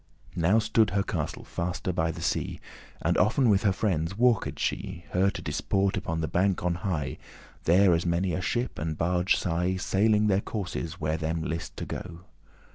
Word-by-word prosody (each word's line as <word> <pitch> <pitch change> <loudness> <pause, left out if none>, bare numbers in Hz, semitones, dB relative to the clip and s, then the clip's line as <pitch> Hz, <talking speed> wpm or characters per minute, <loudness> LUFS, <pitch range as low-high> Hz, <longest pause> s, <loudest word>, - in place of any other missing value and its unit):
Now 90 +6 +3
stood 110 -1 +3
her 100 +1 +1
castle 80 -7 -3
faste 90 +1 -3
by 80 -1 +1
the 80 - -5
sea, - - -1 0.4
And - - +2
often 120 +4 +3
with 100 -1 +3
her 105 - +3
friendes 95 -2 -1
walked 120 -2 +2
she, 85 0 -3
Her 95 +2 +3
to - - -6
disport 95 0 0
upon 80 0 -2
the 80 - -1
bank 90 +3 +1
on 90 - +2
high, 85 -7 -3 0.5
There 90 +2 +5
as 85 +1 +1
many 85 +1 0
a 90 - -1
ship 120 +6 -2
and 80 0 -3
barge 90 +3 +2
sigh,* 90 +1 0
*saw 95 +1 -2
Sailing 105 0 +4
their 100 -1 +3
courses, 90 -7 -4
where 75 +1 0
them 80 +1 -2
list 85 +1 -4
to - - -4
go. 85 0 -7
90 Hz, 190 wpm, -27 LUFS, 85-100 Hz, 0.5 s, There